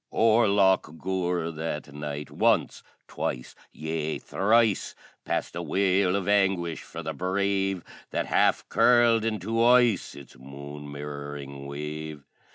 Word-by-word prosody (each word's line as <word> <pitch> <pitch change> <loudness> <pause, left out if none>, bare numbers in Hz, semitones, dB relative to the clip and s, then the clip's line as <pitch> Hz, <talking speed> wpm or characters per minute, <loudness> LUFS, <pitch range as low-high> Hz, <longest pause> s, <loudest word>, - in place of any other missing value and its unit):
O'er 115 0 +4
Loch 95 -5 +2
Gur, 90 -2 -1
that 75 -2 -5
night, 75 0 -6
once - - +1 0.3
twice 60 0 -4 0.2
yea, 80 0 -3
thrice 110 0 +1 0.3
Passed - - -2
a - - -3
wail 95 -1 +2
of 100 -3 -2
anguish 95 -5 +1
for 85 - -8
the 80 0 -4
Brave 95 +2 -1 0.3
That - - -2
half - - +2
curled 120 -2 +4
into 115 +1 0
ice 120 -5 +4
Its 70 -3 -13
moon 70 +2 -9
mirroring 70 -1 -7
wave. 75 0 -6
85 Hz, 125 wpm, -26 LUFS, 75-100 Hz, 0.3 s, O'er